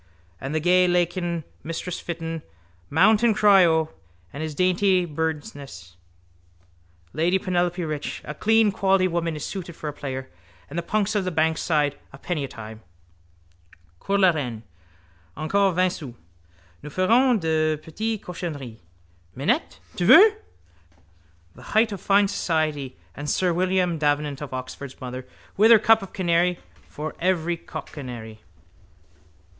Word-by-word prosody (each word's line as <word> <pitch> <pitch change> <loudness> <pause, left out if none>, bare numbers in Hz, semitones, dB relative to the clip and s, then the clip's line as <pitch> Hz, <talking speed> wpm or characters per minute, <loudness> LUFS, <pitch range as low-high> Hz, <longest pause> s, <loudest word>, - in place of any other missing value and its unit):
And 135 +3 -4
the - - +2
gay 180 +3 +4
lakin, 175 -1 0 0.2
mistress 165 +2 -4
Fitton, 165 -1 -5 0.5
mount 205 +8 +4
and 235 -3 +3
cry 200 -3 +6
O, 160 -1 +1 0.4
and 140 - -6
his 155 -2 -4
dainty 185 +1 +2
birdsnies, 145 - -5 1.2
lady 175 +4 +2
Penelope 180 -1 -1
Rich, 150 -2 -4
a 150 - -5
clean 220 +5 +3
quality 190 -1 +2
woman 170 -2 -2
is 150 - -5
suited 180 -4 -6
for 155 - -7
a 150 - -3
player, 130 -2 -5 0.4
and 165 - -2
the - - -1
punks 210 +4 0
of 205 -2 +1
the 185 - -1
bankside, 155 -3 +1
a 135 - -12
penny 155 0 -3
a - - -3
time. 110 -2 -10 1.2
Cours 200 0 0
la 190 -2 +6
Reine. 125 -8 -4 0.7
Encore 195 +6 +2
vingt 185 +1 +2
sous. 135 -9 -8 0.7
Nous 150 - -8
ferons 230 - +3
de 155 -2 +1
petites 215 +8 -4
cochonneries. 145 -10 -6 0.6
Minette? 225 - -1 0.2
Tu - - -1
veux? 430 +1 +9 1.2
—The 130 - -5
height 225 0 +4
of 195 -3 -6
fine 200 +1 +4
society. 155 -8 -1 0.2
And 145 +1 -5
sir 180 +2 +1
William 180 -1 +1
Davenant 145 -1 0
of 145 - -6
Oxford's 130 +1 -7
mother 130 0 -7 0.3
with 215 +3 +6
her 230 - +9
cup 220 +1 +4
of 195 - -9
canary 175 -1 +1 0.3
for 155 +1 -6
any 175 -2 +1
cockcanary. 120 -9 -8
170 Hz, 140 wpm, -24 LUFS, 145-185 Hz, 1.2 s, veux